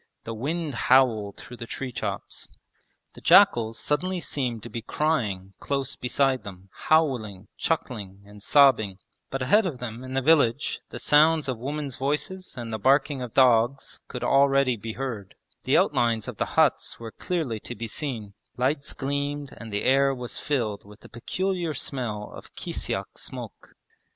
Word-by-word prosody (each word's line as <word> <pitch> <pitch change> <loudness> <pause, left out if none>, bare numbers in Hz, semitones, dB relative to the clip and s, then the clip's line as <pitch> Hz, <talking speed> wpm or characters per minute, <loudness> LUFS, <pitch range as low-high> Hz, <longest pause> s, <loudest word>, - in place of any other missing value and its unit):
The 115 - -5
wind 150 +6 -3
howled 120 -5 +3
through 125 - -10
the 115 - -7
tree 130 +1 -5
tops. - - -5 0.7
The - - -13
jackals 115 -1 +5
suddenly 180 +5 0
seemed 125 -9 -3
to - - -6
be 115 - -4
crying 110 -9 -1
close 140 -1 -2
beside 130 0 +1
them, 95 -2 -11 0.2
howling, 115 - +2
chuckling, 105 - -3
and 105 0 -14
sobbing; 115 -7 +4 0.3
but 135 -1 -2
ahead 205 +10 +4
of 150 -8 -4
them 125 0 -6
in 130 0 -6
the 135 - +2
village 145 -4 +3
the - - -7
sounds 155 +1 +4
of 130 -4 -2
women's 140 +1 -4
voices 150 +8 -2
and 115 -2 -5
the 110 - -2
barking 135 +3 +3
of 125 -3 -6
dogs 125 +1 +3
could 125 -1 -6
already 135 -1 +4
be 110 0 -6
heard; 115 -7 -5 0.3
the - - +4
outlines 115 -3 +2
of - - -6
the - - 0
huts - - +2
were 115 -1 -7
clearly 155 -11 -2
to 120 - -7
be 115 - -5
seen; 110 -4 -4 0.2
lights 140 +3 0
gleamed 140 +1 -3
and 115 -2 -9
the 105 0 -1
air 135 +1 +4
was 125 -1 -4
filled 115 -8 -1
with 105 +1 -16
the - - -14
peculiar 175 +6 -2
smell 115 -6 -3
of - - -12
kisyak - - -4
smoke. - - -8
130 Hz, 165 wpm, -26 LUFS, 115-145 Hz, 0.7 s, jackals